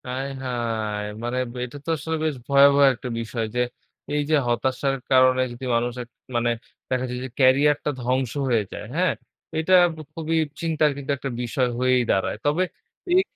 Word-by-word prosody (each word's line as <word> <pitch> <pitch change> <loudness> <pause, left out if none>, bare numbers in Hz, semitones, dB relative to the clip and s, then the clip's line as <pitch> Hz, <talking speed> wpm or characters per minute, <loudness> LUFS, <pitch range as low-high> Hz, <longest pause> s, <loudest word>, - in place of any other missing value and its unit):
আয় 130 +2 -3 0.2
হায়! 110 -4 -2 0.2
মানে 120 +1 -2 0.3
এটা 125 +3 -9
তো - - -5
আসলে 160 +3 -3
বেশ 155 -2 0
ভয়াবহ 140 0 +6
একটা 125 +1 -7
বিষয় 115 0 -3
যে - - +1 0.5
এই 150 - +2
যে 155 - +4
হতাশার 130 +3 0 0.2
কারণে 130 0 +5
যদি 120 +2 -7
মানুষের, 120 +1 -1 0.3
মানে 120 0 +2 0.4
দেখা 130 0 0
যায় 125 0 -4
যে - - -6
ক্যারিয়ারটা 140 +3 +4
ধ্বংস 125 0 0 0.2
হয়ে 115 -3 +3
যায়। - - -6
হ্যাঁ? 180 +2 +2 0.4
এইটা 160 +4 +1 0.4
খুবই 165 0 -2 0.3
চিন্তার 160 -2 +2
কিন্তু 140 0 -3
একটা 135 - -4
বিষয় 125 +1 0
হয়েই 130 0 +3
দাঁড়ায়। 95 - 0
তবে 150 +5 +2 0.5
এই 365 +1 +6
130 Hz, 160 wpm, -24 LUFS, 120-145 Hz, 0.5 s, ভয়াবহ